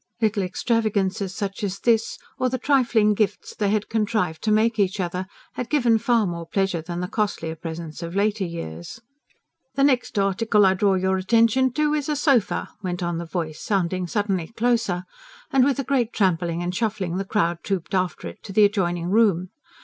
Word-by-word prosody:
Little 215 -2 +1
extravagances 200 -1 0
such 200 +1 -4
as 200 -1 -2
this, 225 +1 +1 0.2
or 255 - +2
the 255 - -1
trifling 240 -6 +3
gifts 205 -1 -1
they 205 -2 0
had 210 0 0
contrived 210 -7 -1
to 215 - 0
make 220 +1 +2
each 200 +1 +1
other 180 +1 -2 0.3
had 250 - -5
given 240 -7 +3
far 230 -1 +2
more 170 -2 -4
pleasure 195 -3 0
than 175 +2 -5
the 180 - -2
costlier 190 -6 -2
presents 165 0 -7
of 170 +1 -6
later 205 0 +1
years. 85 - -6 0.8
"The 275 - +2
next 260 -5 +2
article 205 +1 +3
I 190 - +5
draw 195 0 +2
your 190 0 +1
attention 230 +6 +3
to 300 +1 +1
is 300 -1 -1
a 300 - +1
sofer," 275 -7 +1
went 180 -1 -3
on 175 -1 -2
the 170 - -5
voice, 160 -2 -4
sounding 185 -2 -1
suddenly 195 -3 -1
closer; 230 -6 0 0.5
and 265 -1 +4
with 275 +1 +2
a 275 - -1
great 245 -3 0
trampling 175 -3 0
and 175 +1 -2
shuffling 195 -5 -2
the 195 - -1
crowd 175 -4 0
trooped 195 -1 -3
after 185 -1 -1
it - - -10
to 200 - -9
the 210 +1 +6
adjoining 175 -4 0
room. 195 -5 +3
200 Hz, 190 wpm, -23 LUFS, 180-230 Hz, 0.8 s, the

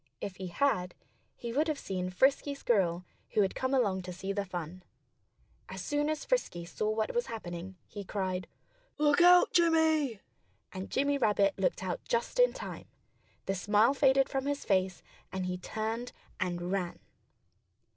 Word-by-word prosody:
If 185 -3 -6
he 190 - -5
had, 180 -3 0 0.4
he 235 -1 -6
would 300 +5 +2
have 310 -2 0
seen 185 -7 -3
Frisky 270 +8 +2
Squirrel, 185 -9 +1 0.3
who 210 - +4
had 190 - -1
come 260 0 -2
along 205 -8 +2
to 180 0 -7
see 190 +2 -4
the 200 0 -1
fun. 180 -1 -6 0.9
As - - -6
soon 295 0 0
as 310 -1 -2
Frisky 175 - -1
saw 210 +5 -2
what 215 0 -1
was 480 0 0
happening, 185 -4 -6
he 205 - -8
cried: 185 -2 -3 0.5
"Look 295 +2 +4
out, 355 0 +7
Jimmy!" 320 - +3 0.5
And 190 0 -6
Jimmy 280 +1 +1
Rabbit 205 -4 +3
looked 190 0 0
out 180 -2 -3
just 235 - -1
in - - +6
time. - - -7 0.6
The 195 - 0
smile 210 +6 +3
faded 270 -1 +4
from 270 0 -2
his 285 0 -2
face. 185 -2 +1 0.3
And 190 -1 -3
he 180 0 -3
turned 225 +5 -4 0.3
and 175 0 -2
ran. 185 -3 -1
210 Hz, 165 wpm, -31 LUFS, 185-280 Hz, 0.9 s, out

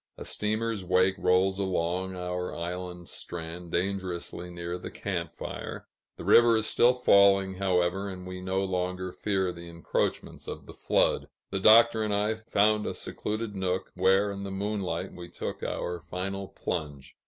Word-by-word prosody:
A - - -7
steamer's 110 -1 -1
wake 95 +1 +3
rolls 95 +2 +3
along 95 0 -1
our 90 0 -3
island 90 0 -5
strand, 85 0 -6
dangerously 90 -2 -2
near 85 0 -5
the - - -6
camp - - -4
fire; - - -6 0.3
the - - -8
river 120 -1 +7
is 110 - +1
still 125 +3 +4
falling, 100 -5 +5
however, 95 0 +1
and 90 -1 -7
we 90 0 -6
no 95 +1 0
longer 90 -1 -2
fear 95 -2 0
the 85 0 -10
encroachments 85 -1 -2
of - - -6
the - - -11
flood. - - +1 0.2
The 95 - -1
Doctor 110 +2 +7
and 105 -1 0
I 105 +2 +1
found 110 -1 +2
a - - -3
secluded 110 0 -4
nook, 95 -1 -2
where 95 +2 +3
in 100 0 -6
the 100 - -4
moonlight 95 -2 -2
we 85 -1 -9
took - - -5
our 90 0 -3
final 95 +3 -4
plunge. 75 -8 -5
95 Hz, 160 wpm, -28 LUFS, 90-100 Hz, 0.3 s, river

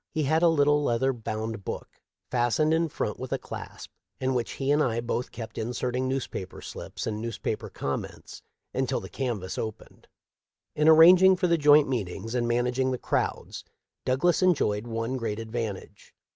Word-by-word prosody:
He 155 -2 -1
had 155 +4 +2
a 175 - +6
little 145 -2 +3
leather 130 +1 +1
bound 110 -2 -5
book, - - -5 0.4
fastened 125 +6 +2
in 165 0 +1
front - - -3
with - - -6
a - - +1
clasp, - - -9 0.3
in 130 0 0
which 120 -2 -2
he 135 0 -1
and 150 +1 +3
I 115 -5 +1
both 120 +1 -3
kept 115 -1 -7
inserting 125 +2 -2
newspaper 130 -8 -4
slips - - -7
and 110 -1 -3
newspaper 115 -2 -4
comments 70 - -5 0.3
until 130 0 0
the - - -9
canvass 115 -9 -3
opened. 110 -2 -7 0.7
In 150 +1 +4
arranging 180 +4 +8
for 180 - -1
the 170 -1 +3
joint 150 -1 +6
meetings 115 -2 -3
and 120 -1 0
managing 125 +2 +1
the 130 - -1
crowds - - -2 0.4
Douglas 145 +9 +2
enjoyed 120 - +2
one 115 +3 -2
great 110 -4 -3
advantage. 115 -3 -6
125 Hz, 165 wpm, -27 LUFS, 115-145 Hz, 0.7 s, arranging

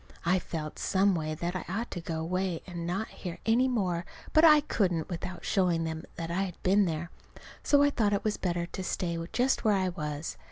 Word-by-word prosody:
I 180 +2 +3
felt, 155 -3 -5
some 195 +1 +3
way, 155 -2 -2
that 175 +3 -3
I 185 - -2
ought 225 +6 -3
to 175 - -4
go 165 -1 -3
away 180 +1 -1
and 175 -2 -5
not 195 +6 -2
hear 175 -3 -7
any 235 +3 +4
more; 185 -9 0 0.3
but 310 - +6
I 305 -2 +8
couldn't 180 - 0
without 175 0 -5
showing 180 -4 +2
them 160 +1 -4
that 165 0 -4
I 180 +3 0
had 185 -3 -4
been 200 +2 +4
there. 165 0 -3 0.5
So 285 -1 +4
I 285 - +4
thought 215 -6 +1
it 200 0 0
was 215 -1 0
better 175 -2 -1
to 185 +2 -6
stay 170 -2 -2
just 255 +2 +1
where 215 -2 +4
I 190 -1 +1
was. 150 -2 -4
180 Hz, 215 wpm, -29 LUFS, 170-205 Hz, 0.5 s, I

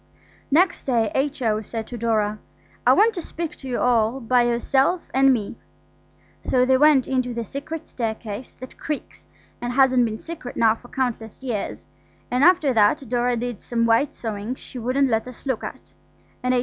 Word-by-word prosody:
Next 345 +5 +2
day 230 -5 +1
H.O. 265 -6 0
said 225 0 -5
to 245 - -8
Dora, 215 -2 0 0.5
"I - - +8
want 445 +3 +4
to 360 - -4
speak 330 0 -5
to 270 - -9
you 250 - -2
all 235 0 +2
by 250 0 +3
yourself 265 +8 +2
and 270 +1 +5
me." 230 -3 -2 0.8
So 250 -1 +2
they 260 0 +4
went 295 -3 +5
into 255 -2 -1
the 235 - -2
secret 285 +8 -6
staircase 225 0 -5
that 255 +1 -11
creaks 300 -2 -6 0.3
and 245 0 -3
hasn't 260 -2 +4
been 220 -1 -3
secret 310 -3 -8
now 225 -1 +5
for 235 +2 -14
countless 245 -2 -3
years; 230 -6 -4 0.5
and 250 +2 +2
after 330 -6 +5
that 230 +6 +3
Dora 245 0 +1
did 240 -3 -4
some 230 -1 0
white 230 +5 +2
sewing 220 +1 -4
she 255 - -9
wouldn't 255 +4 +1
let 225 +1 0
us 255 - -11
look 260 -5 -1
at, - - -9 0.5
and 255 0 +1
H.O. - - +3
245 Hz, 180 wpm, -23 LUFS, 230-270 Hz, 0.8 s, I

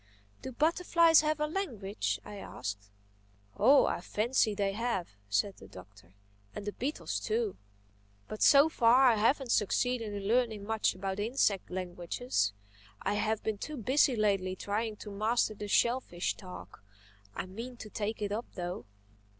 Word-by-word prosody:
"Do 260 - -6
butterflies 330 +3 +4
have 305 0 0
a 300 - +1
language?" 250 - -3
I 205 - -8
asked. 105 - -6 0.7
"Oh 280 +1 +6
I - - -1
fancy 220 +2 +1
they 200 -1 0
have," 225 -5 -2 0.2
said 190 - 0
the - - -13
Doctor—"and 100 - -14
the 205 - -2
beetles 275 +8 -3
too. 445 -2 -1 0.7
But 215 - -7
so 280 +2 +7
far 250 -3 +4
I 225 - +3
haven't 245 +3 +2
succeeded 230 +2 +1
in 200 -1 -5
learning 225 -3 +1
much 220 -2 0
about 190 +1 -4
insect 210 -3 +1
languages. 180 - -2 0.5
I - - 0
have 215 +1 -1
been 215 -2 -2
too 305 +5 -5
busy 260 +3 +3
lately 195 -4 +1
trying 215 +3 -2
to 210 0 -9
master 215 +2 +1
the 210 0 -7
shellfish 205 - +1
talk. 90 +1 -11 0.5
I - - -3
mean 230 +7 -8
to 215 - -9
take 215 0 -3
it 200 - -2
up 225 +4 -3
though." 180 0 -5
215 Hz, 150 wpm, -31 LUFS, 190-250 Hz, 0.7 s, so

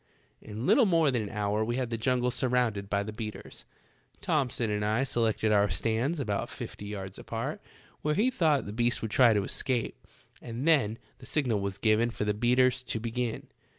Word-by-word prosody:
" - - -40
In 110 +4 -4
little 245 - +5
more 165 -5 +3
than 120 -3 0
an 105 - -5
hour 105 +1 -1
we 120 +2 -2
had 125 -2 -2
the - - 0
jungle 125 +2 +1
surrounded 120 -6 0
by 100 0 0
the 110 +1 -6
beaters. 110 -1 -7 0.5
Thomson 125 -6 0
and 105 0 -1
I 110 +5 +1
selected 115 -4 +1
our 105 -1 +4
stands 120 +9 0
about 105 -7 -2
fifty 105 - -7
yards 95 -2 -6
apart, - - -4 0.4
where 150 0 0
we 235 +6 +2
thought 155 - +2
the 100 - -6
beast 120 +1 0
would 110 - -3
try 125 -1 +6
to 105 -2 +2
escape, 120 +3 -2 0.3
and 120 +5 -4
then 125 -9 +3 0.2
the - - -12
signal 125 -9 0
was 100 -1 -3
given 110 +3 +2
for 115 - -4
the 105 - +1
beaters 125 +3 +3
to 120 -3 -3
begin. 115 +1 -3
115 Hz, 195 wpm, -29 LUFS, 105-130 Hz, 0.5 s, try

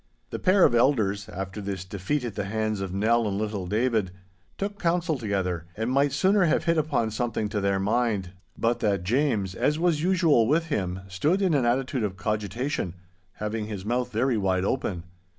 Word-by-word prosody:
The - - -4
pair 185 0 +4
of - - +3
elders, 110 -6 +2
after 95 +2 -5
this 95 -2 -4
defeat 100 +9 -2
at 115 - -4
the 100 - -3
hands 110 0 -1
of 95 -2 -3
Nell 110 +4 +2
and 100 -1 -2
little 105 -3 -3
David, 110 -1 +1 0.5
took 205 +1 -4
counsel 170 -3 +1
together, 95 -6 -2
and 110 +3 -1
might 140 +1 +3
sooner 185 +7 +3
have 160 - +2
hit 165 -1 +2
upon 140 -7 0
something 110 -1 -2
to 105 - -2
their 100 0 +1
mind, 105 -3 0 0.3
but 115 +1 +1
that 100 -4 0
James, 110 -3 +1
as 150 +10 +1
was 165 -2 +1
usual 165 -10 +3
with 160 +4 +1
him, 95 - -2
stood 145 - +1
in 190 -4 +2
an 135 -4 +2
attitude 130 +1 0
of 95 -3 -3
cogitation, 105 -1 -2 0.4
having 105 0 -3
his 100 -3 -6
mouth 125 +2 -1
very 120 +1 +1
wide 95 -1 +1
open. 100 -8 -2
110 Hz, 185 wpm, -26 LUFS, 100-140 Hz, 0.5 s, pair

